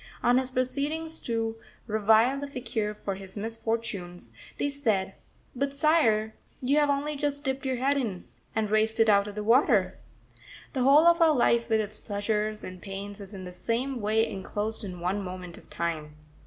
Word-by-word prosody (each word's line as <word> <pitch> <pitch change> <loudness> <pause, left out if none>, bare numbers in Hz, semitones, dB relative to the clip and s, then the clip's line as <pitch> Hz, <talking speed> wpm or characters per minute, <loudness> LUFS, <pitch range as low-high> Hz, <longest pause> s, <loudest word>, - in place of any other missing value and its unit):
On 245 +1 +5
his 260 -1 -2
proceeding 280 +5 -1 0.2
to 225 -1 -1 0.3
revile 220 +4 +3
the 285 - -4
faquir 230 -6 -3
for 195 - 0
his 190 +1 -9
misfortunes, 220 - -4 0.3
they - - 0
said: 220 -10 0 0.4
"But, 280 +2 -1
Sire, 230 -8 +3 0.3
you 275 +4 +2
have 295 -1 +3
only 285 +2 0
just 285 0 -2
dipped 265 0 -2
your 260 - 0
head 265 +3 +2
in, 220 -10 -2 0.3
and 215 -2 0
raised 220 +1 +2
it 225 -1 +5
out 200 0 +4
of 205 - -7
the 210 - -3
water!" 240 +6 +3 0.7
The 260 - -1
whole 280 +5 +6
of 340 0 +5
our 325 -1 +7
life 235 -2 +3
with 220 -1 +3
its 210 -1 -6
pleasures 210 +1 -2
and 185 -1 -8
pains 200 +1 -6
is 200 +1 -9
in 190 - -7
the 180 0 -8
same 240 +5 -2
way 220 +2 +2
enclosed 210 +3 -4
in 180 -3 -7
one 190 +3 -1
moment 180 -2 -7
of - - -21
time. 155 -3 -3
225 Hz, 180 wpm, -28 LUFS, 200-265 Hz, 0.7 s, our